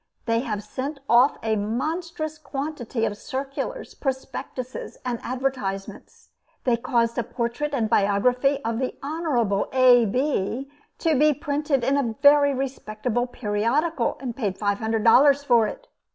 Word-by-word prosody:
They 230 Hz, -1 st, +2 dB
have 215 Hz, -4 st, -3 dB
sent 275 Hz, +5 st, -5 dB
off 245 Hz, +4 st, +5 dB
a 220 Hz, -1 st, +1 dB
monstrous 310 Hz, -, -3 dB
quantity 275 Hz, -6 st, -3 dB
of 205 Hz, -, -2 dB
circulars, 275 Hz, -, -5 dB
prospectuses 265 Hz, -1 st, -5 dB
and 240 Hz, -2 st, -2 dB
advertisements. 250 Hz, -7 st, -4 dB, 0.3 s
They 245 Hz, -2 st, +3 dB
caused 235 Hz, -1 st, 0 dB
a -, -, 0 dB
portrait 240 Hz, +5 st, -3 dB
and 225 Hz, -4 st, +1 dB
biography 250 Hz, +8 st, +2 dB
of 230 Hz, 0 st, -1 dB
the 260 Hz, -, -3 dB
Honorable 275 Hz, -10 st, 0 dB
A. 250 Hz, -2 st, +6 dB
Bee 260 Hz, +2 st, -1 dB, 0.3 s
to 315 Hz, -5 st, +1 dB
be 300 Hz, -1 st, +4 dB
printed 290 Hz, -2 st, -1 dB
in 270 Hz, +3 st, +2 dB
a 235 Hz, -5 st, -1 dB
very 285 Hz, 0 st, +6 dB
respectable 245 Hz, -3 st, -2 dB
periodical, 245 Hz, +6 st, 0 dB
and 245 Hz, -3 st, -5 dB
paid 205 Hz, -7 st, -2 dB
five 200 Hz, -1 st, 0 dB
hundred 220 Hz, -1 st, -1 dB
dollars 280 Hz, +4 st, +6 dB
for 235 Hz, -5 st, +4 dB
it. -, -, -8 dB
255 Hz, 140 wpm, -24 LUFS, 230-285 Hz, 0.3 s, A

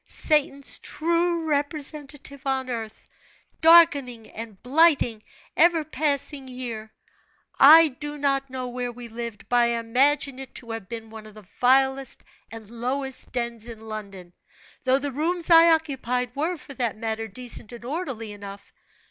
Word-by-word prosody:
Satan's 280 Hz, -2 st, +1 dB
true 335 Hz, +1 st, 0 dB
representative 290 Hz, -2 st, -2 dB
on 265 Hz, -1 st, -1 dB
earth, 225 Hz, -2 st, -6 dB, 0.5 s
darkening 290 Hz, -9 st, +5 dB
and 220 Hz, -3 st, -9 dB
blighting 265 Hz, -5 st, +3 dB, 0.3 s
ever 340 Hz, -2 st, +4 dB
passing 285 Hz, -2 st, -1 dB
year. 235 Hz, -4 st, -6 dB, 0.7 s
I 315 Hz, +3 st, +9 dB
do 295 Hz, +2 st, -7 dB
not 275 Hz, -1 st, 0 dB
know 255 Hz, -1 st, -5 dB
where 245 Hz, 0 st, -4 dB
we 240 Hz, 0 st, -10 dB
lived, 230 Hz, -3 st, -7 dB
but 245 Hz, -, +1 dB
I 240 Hz, -, +5 dB
imagine 270 Hz, +4 st, +1 dB
it 265 Hz, -1 st, -10 dB
to 230 Hz, -, -6 dB
have 225 Hz, -4 st, -7 dB
been 225 Hz, -1 st, -7 dB
one 220 Hz, -1 st, -10 dB
of 215 Hz, -, -15 dB
the 215 Hz, -2 st, -14 dB
vilest 265 Hz, +1 st, +2 dB, 0.3 s
and 225 Hz, -2 st, -10 dB
lowest 255 Hz, +4 st, -4 dB
dens 235 Hz, -2 st, -4 dB
in 225 Hz, -1 st, -10 dB
London, 195 Hz, -5 st, -8 dB, 0.5 s
though 260 Hz, +1 st, +4 dB
the 280 Hz, +1 st, -3 dB
rooms 335 Hz, +5 st, -2 dB
I 330 Hz, 0 st, +8 dB
occupied 250 Hz, -6 st, 0 dB
were, 325 Hz, +5 st, -1 dB
for 285 Hz, -, -12 dB
that 240 Hz, -5 st, -2 dB
matter, 225 Hz, 0 st, -3 dB
decent 235 Hz, +1 st, -6 dB
and 235 Hz, -1 st, -10 dB
orderly 265 Hz, -7 st, -4 dB
enough. 200 Hz, -1 st, -11 dB
255 Hz, 150 wpm, -25 LUFS, 230-290 Hz, 0.7 s, I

